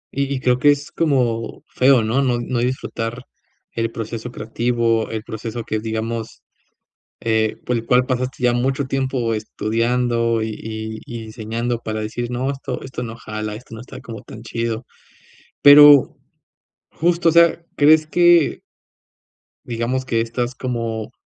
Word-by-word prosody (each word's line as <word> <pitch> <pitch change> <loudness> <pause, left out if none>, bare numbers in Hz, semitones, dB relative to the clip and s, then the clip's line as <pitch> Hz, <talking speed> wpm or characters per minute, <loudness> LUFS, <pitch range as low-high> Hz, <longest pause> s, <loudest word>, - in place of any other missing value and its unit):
Y 140 0 -1
y - - -3
creo 125 0 +2
que 145 - +5
es 145 +1 -3
como 125 -8 0
feo, 130 -2 +4
¿no?, 115 +6 +1
no 125 -2 +1
no 120 0 -2
disfrutar 120 -1 -3 0.5
el 115 0 -2
proceso 115 +1 -6
creativo, 115 0 0
el 110 -1 -4
proceso 115 0 -6
que 110 - -2
digamos, 110 +1 -4 0.8
eh, 110 -1 +1
por 125 - 0
el 115 - -5
cual 125 +1 +3
pasaste 130 0 -3
ya 120 - +4
mucho 135 +3 0
tiempo 130 -4 -1
estudiando 115 +1 0
y 110 - -3
y 110 0 -6
y 115 -1 -7
enseñando 115 +2 -3
para 110 -1 -4
decir: 120 +3 -4
"No, 130 +3 -1
esto 135 -1 -5
esto 130 -2 -6
no 115 -1 -6
jala, 110 0 -5
esto 115 0 -11
no 110 - -9
está 130 +1 -11
como 115 -5 -9
tan 110 - -11
chido". 115 0 -3 0.8
Pero 145 -1 +8 0.7
justo, 170 +1 +1
o - - +2
sea, 170 0 +5
¿crees 155 +1 +5
que 175 -2 +4 1.0
digamos 120 +2 -2
que 115 -2 0
estas 120 +2 -3
como 115 -4 -4
120 Hz, 150 wpm, -20 LUFS, 115-130 Hz, 1.0 s, Pero